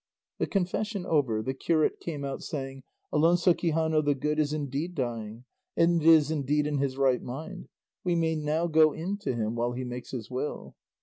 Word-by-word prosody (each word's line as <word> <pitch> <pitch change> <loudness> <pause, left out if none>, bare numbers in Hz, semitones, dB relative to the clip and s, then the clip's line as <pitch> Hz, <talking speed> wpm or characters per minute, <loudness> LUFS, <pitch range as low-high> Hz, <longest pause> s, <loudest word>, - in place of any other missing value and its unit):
The - - 0
confession 195 +1 -1
over, 130 -11 +1
the 130 - -2
curate 155 +3 +1
came 150 -4 -5
out 135 -1 -4
saying, 135 -2 -5 0.3
"Alonso 175 +3 +4
Quixano 160 -2 +1
the 145 -1 +2
Good 150 +3 -1
is 150 -1 +1
indeed 150 +3 -3
dying, 115 -3 -4 0.3
and 170 0 +4
is 160 -2 +6
indeed 150 0 +1
in 150 -1 -1
his 135 -1 -1
right 135 -2 +3
mind; 155 +9 -7 0.4
we 175 -2 +1
may 165 -1 +1
now 155 +2 0
go 155 -2 +5
in 185 +5 -3
to 200 -11 -2
him 110 -1 -1
while 120 +1 -1
he 130 +1 -4
makes 125 0 -6
his 120 -2 -6
will." 130 +4 -4
150 Hz, 185 wpm, -28 LUFS, 130-165 Hz, 0.4 s, is